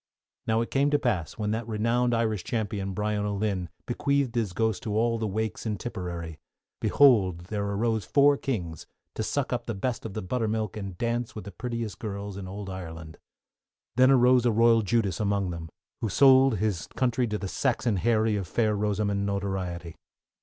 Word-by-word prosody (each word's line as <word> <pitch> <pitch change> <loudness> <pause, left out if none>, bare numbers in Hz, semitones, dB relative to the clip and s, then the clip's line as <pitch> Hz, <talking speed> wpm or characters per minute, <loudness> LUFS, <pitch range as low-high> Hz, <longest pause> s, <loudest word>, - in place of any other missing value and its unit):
_ - - -40
Now 110 0 +2
it 115 - -4
came 140 +1 +3
to 145 - +3
pass 105 - -1
when 105 -1 -1
that 110 +1 -2
renowned 115 +2 +1
Irish 110 -5 0
Champion, 100 -4 -2
Brian 105 0 -1
O'Lynn, 100 -3 -1 0.2
bequeathed 140 0 0
his 115 -5 0
ghost 110 0 0
to 105 -1 -2
all 115 0 +1
the 110 - -1
wakes 110 +2 -3
in 105 -2 -1
Tipperary, 85 -7 -5 0.4
behold 100 -11 +4
there 100 -1 -1
arose 110 +1 0
four 145 0 +4
kings 90 - -4 0.3
to - - -4
suck 135 +4 -1
up 120 -1 -3
the 115 - -2
best 120 +5 -2
of 110 -4 -7
the 110 - -3
buttermilk 110 0 -1
and 100 -4 -6
dance 120 +1 -2
with 105 - -7
the 100 - -7
prettiest 115 -1 -4
girls 100 -3 -5
in 95 -1 -6
Ould 100 +1 -6
Ireland. 80 -4 -8 0.8
Then 130 +1 +6
arose 125 -2 +5
a - - +4
Royal 115 +1 +5
Judas 105 -3 0
among 100 -3 0
them, 85 -1 -6 0.3
who 110 - 0
sold 130 +1 +6
his 100 -4 -1
country 125 -1 +1
to 105 -1 -2
the 100 - -4
Saxon 115 +2 0
Harry 110 +1 +2
of 95 -3 -4
Fair 110 +5 +1
Rosamond 100 -1 0
notoriety. 95 -4 -3
110 Hz, 185 wpm, -27 LUFS, 100-120 Hz, 0.8 s, Then